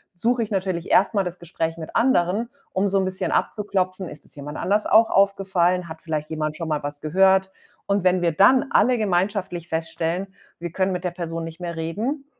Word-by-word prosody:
suche 235 +6 +1
ich 220 - -2
natürlich 185 -4 -2
erst 195 +4 +4
mal 200 -2 +2
das 180 0 -5
Gespräch 165 -1 -4
mit 160 -1 -8
anderen, 230 -2 +2 0.2
um 195 +2 +1
so 195 - +1
'n 190 - +2
bisschen 185 -2 -2
abzuklopfen, 185 -3 -1
ist 150 - -12
es - - -17
jemand 145 +1 -7
anders 205 +2 0
auch 225 +1 +5
aufgefallen? 185 -3 +2
Hat 160 0 -9
vielleicht 155 -2 -3
jemand 155 -1 -2
schon 165 -2 -4
mal 150 -1 0
was 145 0 -6
gehört? 190 +4 +3 0.3
Und 200 -2 0
wenn 185 0 +3
wir 170 - +3
dann 210 +10 +5
alle 250 0 +4
gemeinschaftlich 185 -3 -1
feststellen, 165 +3 -2 0.3
wir 170 -1 -6
können 190 +2 0
mit 180 0 -3
der 180 - -1
Person 165 -1 -5
nicht 165 +1 -8
mehr 170 -1 -5
reden, 220 - -3
185 Hz, 205 wpm, -23 LUFS, 165-195 Hz, 0.3 s, auch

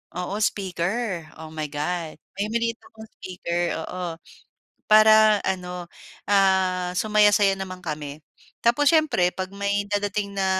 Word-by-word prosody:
oo, 180 +2 -3
speaker, 190 0 -2 0.2
oh 160 - -8
my 155 -1 -3
God. 160 +2 -3 0.2
May 205 - 0
maliit 230 0 0
akong 220 0 -14
speaker, 175 -2 -3
oo, 180 -2 -5 0.7
para 215 0 +7
ano 180 -2 -3 0.4
ah, 190 -2 +2
sumaya-saya 210 -1 +4
naman 190 -1 -6
kami. 150 -2 -6 0.4
Tapos 260 +5 +4
siyempre 310 - +3
'pag 185 -1 -4
may 200 0 -1
dadating 205 0 -2
na 195 - +1
190 Hz, 125 wpm, -24 LUFS, 180-210 Hz, 0.7 s, para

